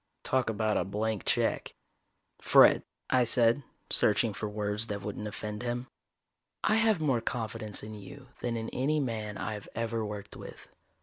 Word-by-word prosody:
Talk 130 -3 +1
about 110 0 +1
a - - +2
blank 105 +2 -2
check. - - 0 0.7
"Fred," - - +7 0.3
I 130 -1 +5
said, 120 +2 +4 0.3
searching - - +3
for 105 - -4
words 105 +1 -1
that 100 -1 -4
wouldn't 105 +1 -4
offend 105 0 -5
him. 120 0 -2 0.8
"I - - +3
have 220 -4 +3
more 135 -7 +1
confidence 110 -3 -2
in 110 +1 -7
you 125 +6 -11
than 120 -1 -2
in 115 0 -4
any 150 +4 +1
man 110 -6 -3
I've 105 -1 -5
ever 115 0 -1
worked 105 -1 -6
with. - - -10
110 Hz, 160 wpm, -30 LUFS, 105-125 Hz, 0.8 s, Fred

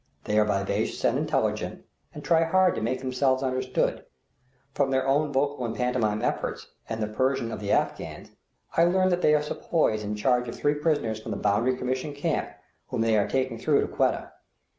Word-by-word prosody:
They 105 +1 +1
are 105 - +4
vivacious 100 -2 -1
and - - +3
intelligent, - - -1 0.3
and 150 - -9
try 165 -1 +3
hard 185 +3 +3
to - - -4
make 120 +4 -1
themselves 130 0 +1
understood. 130 0 -1 0.7
From 140 -2 +1
their 130 0 +1
own 145 +2 +2
vocal 140 -1 0
and 115 -1 -3
pantomimic 115 -3 0
efforts - - -3 0.2
and 110 -1 -2
the - - -1
Persian 120 +1 0
of - - -5
the 100 -1 -3
Afghans, - - -1 0.4
I 165 - +5
learn 185 +2 +3
that 180 0 +1
they 150 - +5
are 150 - +1
sepoys 150 -7 0
in 105 0 -3
charge 125 +3 +1
of 115 - -5
three 145 - +1
prisoners 145 -8 -1
from - - -8
the - - -2
Boundary 115 +5 +1
Commission 130 +3 -3
camp, 150 +2 -1 0.4
whom 125 -3 -2
they 115 -1 +3
are 105 - +2
taking 130 -3 -1
through 145 +3 +3
to - - -1
Quetta. - - 0
130 Hz, 195 wpm, -26 LUFS, 115-145 Hz, 0.7 s, I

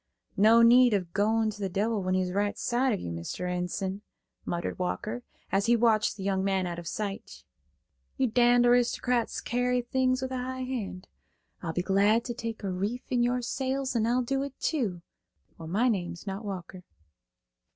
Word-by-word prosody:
"No 225 +3 +6
need 240 -1 +6
of 180 -4 -3
goin' 220 +2 +2
to 205 0 -11
the 195 - -1
devil 210 +3 0
when 185 0 0
he's 185 -1 0
right 205 +2 0
side 250 +2 +1
of 205 - -1
you, 85 - -5
Mr. 85 - -5
Enson," 180 +2 -3 0.4
muttered 170 +1 -3
Walker, 215 +6 -3 0.3
as 200 +3 +1
he 240 - +5
watched 220 -3 +2
the 195 - -6
young 190 -1 0
man 190 -1 +1
out 175 -1 -4
of 170 - -8
sight. 205 +1 -5 0.7
"You 265 - +2
d–d 245 +1 +4
aristocrats 245 0 +2
carry 245 +1 0
things 255 +1 +1
with 260 - -3
a 260 - -2
high 260 +1 -4
hand; 220 -8 -5 0.5
I'll 165 -2 -3
be 180 - -1
glad 205 +4 +3
to 240 - -3
take 230 -2 -6
a 195 - -2
reef 205 +7 -2
in 245 -1 +2
your 245 +1 +1
sails, 265 +1 -2
and 225 -1 +2
I'll 250 +2 +2
do 270 +3 -1
it, 275 -1 -6
too, 205 - -1 0.6
or 165 - -7
my 210 +9 +2
name's 175 -6 -2
not 195 +2 -5
Walker." 185 -2 -7
220 Hz, 185 wpm, -28 LUFS, 190-245 Hz, 0.7 s, No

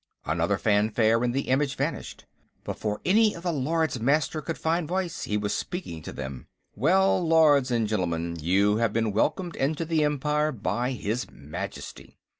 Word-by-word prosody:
Another - - 0
fanfare, 110 +2 +2
as 125 - +2
the 135 +3 0
image 135 +1 +1
vanished. - - -4 0.4
Before 105 -1 -3
any 215 +3 +4
of 170 - -9
the 175 -2 0
Lords 155 -1 0
Master 150 +5 +1
could 165 +1 -4
find 165 0 0
voice, 180 0 -2
he 105 - -1
was 105 -1 -1
speaking 170 - -5
to - - -7
them: 65 -2 -7 0.3
"Well, 185 - +3
Lords 155 -5 +4
and 115 -3 +1
Gentlemen, 85 -5 -2
you 100 +6 +3
have 115 -2 +1
been 115 -1 +1
welcomed 175 - 0
into 150 +4 -1
the 160 -1 +1
Empire 150 +1 +1
by 120 +3 -2
his 115 +1 -3
Majesty. 70 +2 -8
130 Hz, 165 wpm, -26 LUFS, 105-160 Hz, 0.4 s, any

